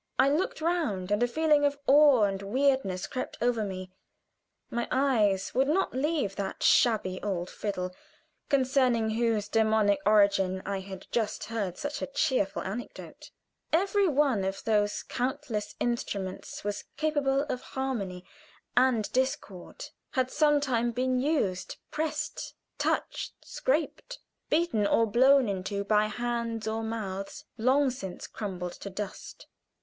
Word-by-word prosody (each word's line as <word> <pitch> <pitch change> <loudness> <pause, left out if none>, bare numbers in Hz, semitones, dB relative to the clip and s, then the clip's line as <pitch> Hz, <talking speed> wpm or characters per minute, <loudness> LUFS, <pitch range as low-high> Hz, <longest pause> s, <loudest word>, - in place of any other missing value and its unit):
I 265 +1 +5
looked 365 - 0
round, 295 - -1
and 205 +2 +2
a 245 - +4
feeling 300 +3 +3
of 285 0 +2
awe 280 -5 +6
and 195 -1 0
weirdness 235 -4 +1
crept 255 - -5
over 235 -2 +1
me. 185 -2 -5 0.8
My 235 0 -1
eyes 220 -8 +2
would 265 +2 +2
not 375 +6 +1
leave 270 -6 0
that 200 - -4
shabby 205 -6 +3
old 185 -3 -3
fiddle, 185 -3 -3 0.6
concerning 255 -4 +2
whose 225 -2 +1
demoniac 215 -2 +3
origin 200 -3 +3
I 200 0 -2
had 190 0 -9
just 220 -3 -1
heard 205 -6 -3
such 290 0 -4
a - - -2
cheerful 260 -9 0
little 190 - -3
anecdote. 245 +3 -9 0.4
Every 390 +4 +3
one 275 - +2
of 195 0 -3
those 210 -2 +1
countless 240 -4 -3
instruments 200 -6 -3
was 205 0 -3
capable 285 -3 +1
of 255 -4 -4
harmony 205 -10 -4 0.5
and 250 -4 +4
discord 260 - -2 0.3
had 255 -2 0
some 295 -1 +4
time 240 -4 0
been 255 +1 0
used; 250 - -1
pressed, 310 0 -3 0.2
touched, - - -1
scraped, - - -2 0.3
beaten 300 -11 +2
or 230 - +3
blown 260 +4 +5
into 200 +1 -2
by 210 +1 +3
hands 235 -1 -3
or 220 +1 -1
mouths 200 -4 -5
long 260 +4 +3
since 190 -8 -7
crumbled 180 -4 -5
to 200 - -8
dust. 200 0 -7
230 Hz, 135 wpm, -29 LUFS, 200-270 Hz, 0.8 s, awe